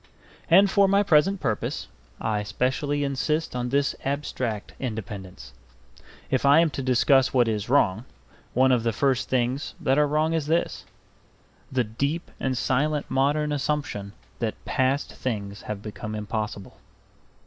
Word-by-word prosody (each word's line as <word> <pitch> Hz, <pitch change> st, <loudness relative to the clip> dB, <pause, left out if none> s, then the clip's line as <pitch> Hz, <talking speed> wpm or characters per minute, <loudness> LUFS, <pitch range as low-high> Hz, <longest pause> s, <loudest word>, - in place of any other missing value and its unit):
And 195 Hz, +4 st, +7 dB
for 200 Hz, 0 st, +4 dB
my 200 Hz, +1 st, +4 dB
present 190 Hz, +2 st, +3 dB
purpose 110 Hz, -9 st, -2 dB, 0.3 s
I 105 Hz, -1 st, -1 dB
specially 130 Hz, +7 st, -1 dB
insist 145 Hz, +2 st, -1 dB
on 125 Hz, 0 st, -2 dB
this 140 Hz, +1 st, +1 dB
abstract 130 Hz, -6 st, -3 dB
independence. 100 Hz, -, -6 dB, 0.8 s
If 130 Hz, -, +1 dB
I 140 Hz, +3 st, +6 dB
am 165 Hz, -2 st, +3 dB
to 135 Hz, -, -4 dB
discuss 130 Hz, +1 st, +3 dB
what 120 Hz, -2 st, +4 dB
is 110 Hz, 0 st, -2 dB
wrong, 115 Hz, -5 st, +2 dB, 0.5 s
one 130 Hz, +1 st, +5 dB
of 125 Hz, -2 st, +3 dB
the 115 Hz, 0 st, 0 dB
first 130 Hz, +3 st, +1 dB
things 130 Hz, +2 st, -1 dB
that 135 Hz, 0 st, +2 dB
are 150 Hz, -, +4 dB
wrong 155 Hz, +2 st, +1 dB
is 160 Hz, -3 st, -1 dB
this: 165 Hz, +2 st, 0 dB, 0.9 s
the 130 Hz, -2 st, +2 dB
deep 140 Hz, +9 st, -3 dB
and 130 Hz, -1 st, -1 dB
silent 145 Hz, +4 st, 0 dB
modern 150 Hz, +3 st, +1 dB
assumption 145 Hz, -8 st, -2 dB, 0.3 s
that 110 Hz, -3 st, -3 dB
past 130 Hz, +2 st, 0 dB
things 100 Hz, -5 st, -4 dB
have 105 Hz, -1 st, -6 dB
become 110 Hz, 0 st, -6 dB
impossible. 105 Hz, -2 st, -4 dB
130 Hz, 145 wpm, -25 LUFS, 110-150 Hz, 0.9 s, And